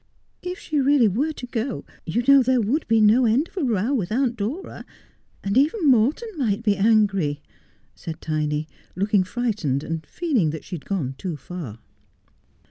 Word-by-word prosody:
' - - -44
If 365 - -6
she 310 -6 -2
really 270 -3 +4
were 260 - 0
to 255 - -7
go, 245 0 -3 0.2
you 230 +9 0
know, 275 -1 +8
there 255 0 +2
would 240 +9 0
be 225 0 +3
no 220 +4 +5
end 250 +9 +2
of - - -25
a - - 0
I'ow 215 +8 0
with 210 -9 -1
Aunt 245 +1 +1
Dora; 245 - -5 0.6
and 200 +1 -1
even 310 - +2
Morton 260 - +2
might 230 -5 0
be 205 -3 +3
angry,' 195 -8 +2 0.5
said 160 -1 -8
Tiny, 155 -1 -2 0.3
looking 200 +1 +2
frightened, 185 - -2
and 165 0 -4
feeling 275 - 0
that 155 0 -6
she - - -11
had 165 - -6
gone 160 -10 -2
too 180 -6 -4
far. 145 - -8
215 Hz, 180 wpm, -23 LUFS, 180-260 Hz, 0.6 s, know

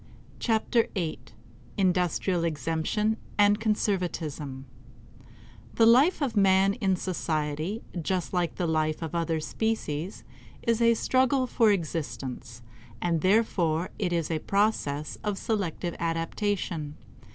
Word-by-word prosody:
Chapter 230 0 +2
Eight 170 -5 -4 0.2
~~ - - -24
Industrial 180 -1 +1
Exemption 165 - 0 0.2
and 205 0 +5
Conservatism 175 -10 -2 1.1
The 225 - +5
life 275 +9 +5
of 250 -5 -1
man 195 -1 +4
in 195 -4 +1
society, 160 +2 -2 0.2
just 180 +3 -2
like 175 -2 0
the 180 - -1
life 155 0 0
of 160 - -5
other 165 -1 0
species, 185 -2 -3 0.4
is 230 0 +1
a 230 0 +5
struggle 260 +3 +2
for 230 -3 +3
existence, 140 - -3 0.4
and 170 -2 0
therefore 185 -4 +2
it 190 -4 0
is 170 -2 -1
a 160 - 0
process 155 -8 0
of 210 -2 -1
selective 185 -6 -2
adaptation. 165 -2 -2
180 Hz, 120 wpm, -27 LUFS, 160-215 Hz, 1.1 s, and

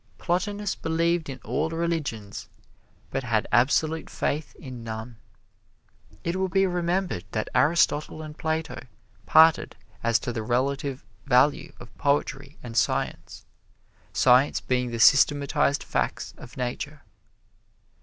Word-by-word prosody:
Plotinus 200 +3 -1
believed 165 0 0
in 135 - -6
all 155 +2 -1
religions, 160 -11 -3 0.6
but 135 - -1
had 115 -3 0
absolute 155 +6 +2
faith 150 +2 -3
in 125 -4 -9
none. 110 +1 -7 1.1
It 170 +2 -1
will 190 0 0
be 195 +2 +3
remembered 180 - -1
that - - -2
Aristotle 155 -1 +2
and 155 -1 -9
Plato 160 -3 -3 0.4
parted 160 +5 +5 0.3
as 115 -1 +3
to 120 - -3
the 115 - -3
relative 135 +4 -1 0.2
value 135 +2 +3
of - - -13
poetry 140 0 -1
and 120 -2 -8
science - - -1 0.7
science 130 +3 +4
being 125 -1 -1
the 115 -1 -5
systematized 140 +2 +4
facts - - -2
of 120 - -13
Nature. 140 +4 -4
145 Hz, 120 wpm, -26 LUFS, 125-160 Hz, 1.1 s, parted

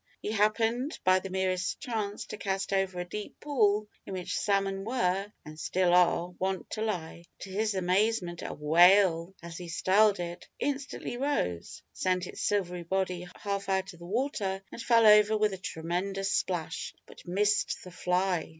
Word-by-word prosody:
He 210 - -4
happened, 225 +5 +1
by 185 0 +5
the 195 - -7
merest 185 -1 -1
chance, 215 -6 -3
to - - -7
cast 195 -1 -2
over 190 -2 0
a 175 - -3
deep 210 +3 -7
pool 215 -7 +2 0.2
in - - -8
which 180 -2 -3
salmon 195 -1 0
were, 200 -3 0
(and 155 +1 -10
still 180 +1 +1
are), 175 -1 +4
wont 190 0 -2
to 215 - -3
lie. 175 -6 -3 0.2
To 195 - -7
his 210 +1 0
amazement, 185 -1 +1
a - - -5
"whale," 175 +3 +4
as 170 0 -7
he 175 - -7
styled 195 +4 +3
it, 175 0 -6
instantly 275 -3 -3
rose, 245 - -2
sent 185 -1 0
its - - -8
silvery 180 -4 0
body 180 0 -2 0.2
half 200 -1 -2
out 190 -1 0
of 170 - -16
the 170 - -10
water, 200 -4 -1
and - - -7
fell 230 -1 +4
over 210 0 +7
with 210 -1 +2
a 190 - -6
tremendous 185 +4 -2
splash, 165 -3 -2
but - - -15
missed 205 +3 +1
the 180 - -10
fly. 180 -1 0
190 Hz, 170 wpm, -29 LUFS, 180-210 Hz, 0.2 s, over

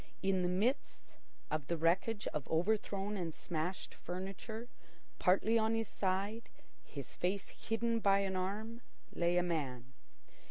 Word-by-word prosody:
In 190 -1 +3
the 180 - +2
midst 215 +10 0 0.4
of 155 -2 -1
the 170 - 0
wreckage 185 +7 +2
of 150 -3 -2
overthrown 200 +3 +1
and 170 -4 -2
smashed 175 +2 -3
furniture, 195 +6 -5 0.5
partly 215 +5 +4
on 220 +1 +2
his 225 -1 -1
side, 200 +4 -1 0.3
his 140 -4 -7
face 190 +2 -1
hidden 230 +1 0
by 200 -2 +5
an 190 -1 0
arm, 215 +5 -2 0.3
lay 175 +1 +2
a 180 - +4
man. 135 -7 -2
190 Hz, 135 wpm, -36 LUFS, 175-220 Hz, 0.5 s, by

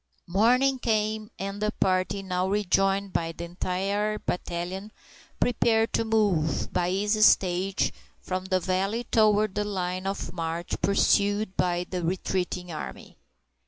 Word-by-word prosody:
Morning 250 +8 +3
came, 215 -2 0
and 195 +1 -5
the 210 - +1
party, 185 +1 +1
now 185 -1 -1
rejoined 195 -1 +1
by 165 0 0
the 165 - -8
entire 195 +4 -1
battalion, 180 +3 -4 0.5
prepared 225 -2 +2
to - - +2
move, 205 -9 +1
by 175 0 +1
easy 205 +3 +1
stages, 190 -1 +3 0.3
from 185 0 -4
the 190 -1 +1
valley 195 +5 -1
toward 215 -3 +3
the 210 - 0
line 185 -2 -3
of 195 -4 -4
march 165 0 -4
pursued 200 0 +2
by 175 0 0
the 180 -1 -3
retreating 180 0 -2
army. 65 - -7
195 Hz, 130 wpm, -27 LUFS, 180-210 Hz, 0.5 s, Morning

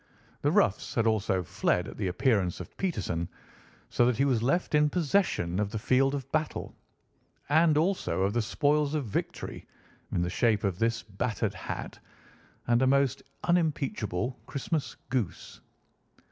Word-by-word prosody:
The - - +2
roughs - - +2
had 115 - +2
also 105 -4 +1
fled 90 0 0
at - - -8
the 100 - -1
appearance 95 -1 +1
of - - -9
Peterson, 95 - -2 0.6
so - - +3
that 125 -3 +1
he 140 - +3
was 125 -5 +2
left 155 +10 +1
in 150 0 +4
possession 150 - +1
of 105 -1 0
the 110 - -4
field 135 +5 +2
of 135 -1 -6
battle, 155 0 -2 0.7
and 160 0 +4
also 165 - +1
of 100 +1 +1
the 120 - +2
spoils 145 +6 +1
of 145 -4 -1
victory 105 - -4 0.4
in 85 - +1
the - - -1
shape 110 -1 +2
of 95 -4 -1
this 115 0 +1
battered 110 +1 -2
hat - - -6 0.7
and 120 0 +3
a 130 - +4
most 140 0 +2 0.2
unimpeachable 135 - 0
Christmas 145 +2 -2 0.2
goose." 120 -9 -3
120 Hz, 155 wpm, -29 LUFS, 100-145 Hz, 0.7 s, in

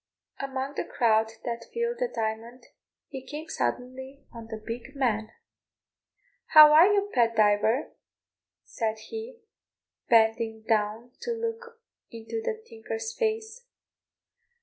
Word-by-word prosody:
Among 270 0 -4
the - - -2
crowd 220 -2 +2
that 235 -1 -4
filled 470 0 -2
the - - +1
Diamond 225 +3 -4 0.4
he 265 -3 -8
came 300 +4 -7
suddenly 260 +1 -4
on 230 -1 -9
the 220 -1 -6
big 235 +5 -8
man. 220 -5 0 1.2
"How 305 -1 +9
are 335 +6 +7
you, 405 0 +1
Pat 230 -2 +3
Diver?" 215 +4 +2 0.7
said 220 -1 -3
he, 450 - -8 0.7
bending 225 -1 +3
down 220 +2 -1
to 475 - -2
look 460 +1 -5 0.3
into 230 - -6
the 445 -1 -3
tinker's 225 0 -6
face. 445 +2 -3
250 Hz, 120 wpm, -27 LUFS, -, 1.2 s, How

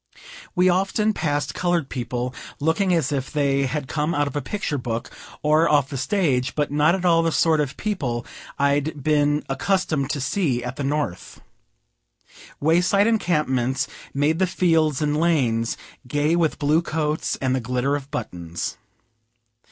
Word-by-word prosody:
We 180 +1 +4
often 195 +4 +2
passed 145 -5 -1
colored 175 -5 0
people, 125 0 -3 0.3
looking 165 +6 +1
as 160 -5 +1
if 135 -1 -2
they 140 -2 +1
had 140 +1 -3
come 150 +4 -1
out 145 0 +2
of 140 - -5
a 145 - 0
picture 200 -8 -3
book, 115 -2 -4 0.3
or 155 +2 +4
off 145 -3 +3
the 145 - -6
stage, 140 -5 0
but 150 -2 0
not 150 +4 +3
at 185 -1 -4
all 165 -2 +5
the 165 0 +1
sort 160 -1 +3
of 140 -2 -3
people 135 - -2 0.3
I'd 140 +1 0
been 150 0 +2
accustomed 150 -1 0
to 145 - -2
see 135 -4 0
at 125 +1 -5
the 145 - -3
North. 140 -10 -3 1.2
Way 160 +4 +3
side 200 +3 +3
encampments 150 - +1 0.2
made 150 +4 +1
the 190 - +3
fields 165 -5 +2
and 150 0 +1
lanes 130 -9 +1 0.3
gay 145 +5 +1
with 165 -3 +1
blue 150 +3 +2
coats 155 -2 -1
and 130 -1 0
the - - 0
glitter 125 +4 0
of 140 -1 -6
buttons. 85 -9 -5
150 Hz, 160 wpm, -23 LUFS, 135-165 Hz, 1.2 s, all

